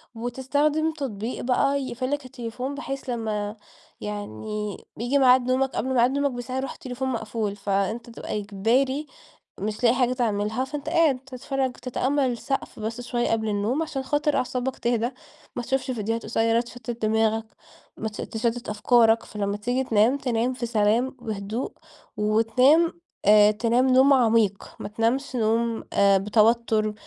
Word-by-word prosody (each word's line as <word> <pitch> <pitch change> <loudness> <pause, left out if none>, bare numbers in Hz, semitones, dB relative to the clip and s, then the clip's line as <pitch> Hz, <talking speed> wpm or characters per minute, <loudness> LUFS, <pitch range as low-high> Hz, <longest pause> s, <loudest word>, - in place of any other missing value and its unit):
وتستخدم 285 +7 0
تطبيق 240 -6 -4
بقى 275 +2 +2
يقفل 255 +1 -3
لك 290 -2 -2
التليفون، 250 +1 -5
بحيث 275 -2 -5
لما 215 -3 -2 0.5
يعني 210 - -5 0.2
بييجي 245 +5 +1
معاد 255 -1 +5
نومك 265 +1 +2
قبل 260 0 -1
معاد 245 +2 +4
نومك 280 0 +1
بساعة 250 +1 -5
يروح 265 0 -3
التليفون 260 +1 -5
مقفول، 220 -3 -2
فأنت 200 +4 -1
تبقى 215 - -4
إجباري 245 +9 0 0.5
مش 215 +4 -4
لاقي 240 +1 +5
حاجة 250 -1 +2
تعملها، 220 -1 0
فأنت 290 +2 -5
قاعد 320 -6 +3
تتفرج 265 0 -3
تتأمل 260 +2 0
السقف 255 +1 -4
بس 225 +3 -4
شوية 240 0 -1
قبل 220 -1 0
النوم، 210 +9 0
عشان 275 -4 -4
خاطر 295 +2 0
أعصابك 255 +1 -2
تهدى، 235 0 +1 0.5
ما 245 - -3
تشوفش 265 +1 -1
فيديوهات 225 -1 -2
قصيرة 225 +1 +2
تشتت 240 -1 -8
دماغك، 220 0 +1 0.5
ما 220 - -3
تش 210 - -12
تشتت 235 +2 -2
أفكارك، 225 +1 +4
فلما 205 -1 -3
تيجي 245 +5 -1
تنام 230 +3 +3
تنام 245 -1 0
في 250 -1 -4
سلام 230 +3 +1
وهدوء، 215 +2 -4 0.5
وتنام، 255 +11 +3 0.2
آآ، 210 +1 +7
تنام 235 +4 +2
نوم 260 +2 +6
عميق، 225 -6 +2
ما - - -5
تنامش 235 +5 -1
نوم، 225 +1 +1
آآ، 200 -1 +5
بتوتر، 215 +1 +2
240 Hz, 145 wpm, -25 LUFS, 220-265 Hz, 0.5 s, آآ